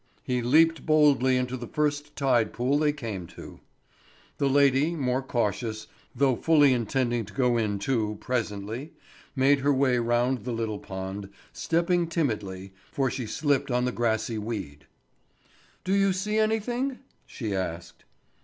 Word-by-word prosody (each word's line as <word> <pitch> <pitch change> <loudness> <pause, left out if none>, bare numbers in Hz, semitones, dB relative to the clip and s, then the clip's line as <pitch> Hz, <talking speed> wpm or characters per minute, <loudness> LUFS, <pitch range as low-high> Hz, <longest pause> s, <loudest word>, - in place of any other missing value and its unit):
he 125 -1 -1
leaped 160 +7 +4
boldly 145 -4 +4
into 125 0 -2
the 120 -2 -7
first 150 +1 -2
tide 125 -6 +1
pool 130 +4 +1
they 150 -1 +3
came 110 - -6
to. - - -12 0.8
The 140 - +2
lady, 140 +3 +3
more 130 -3 0
cautious, 110 -3 -2 0.3
though 135 0 +3
fully 145 -1 +4
intending 120 0 0
to 105 - -14
go 125 -3 +2
in 105 -3 0
too, 105 -1 -1
presently, 115 +3 -3 0.4
made 135 +1 +4
her 140 +2 +2
way 130 -2 +2
round 120 +2 +1
the 125 - -3
little 110 -2 -3
pond, 95 +1 -6 0.2
stepping 170 +1 +1
timidly, 105 - -3 0.2
for 135 -3 0
she 125 -2 -4
slipped 140 +3 0
on 125 0 +1
the 125 - 0
grassy 110 -1 -1
weed. 95 -11 -6 1.0
"Do 190 - -1
you 195 -1 +3
see 210 +3 -1
anything?" 240 +5 0 0.3
she 110 -5 -5
asked. 85 -2 -5
125 Hz, 145 wpm, -27 LUFS, 110-145 Hz, 1.0 s, leaped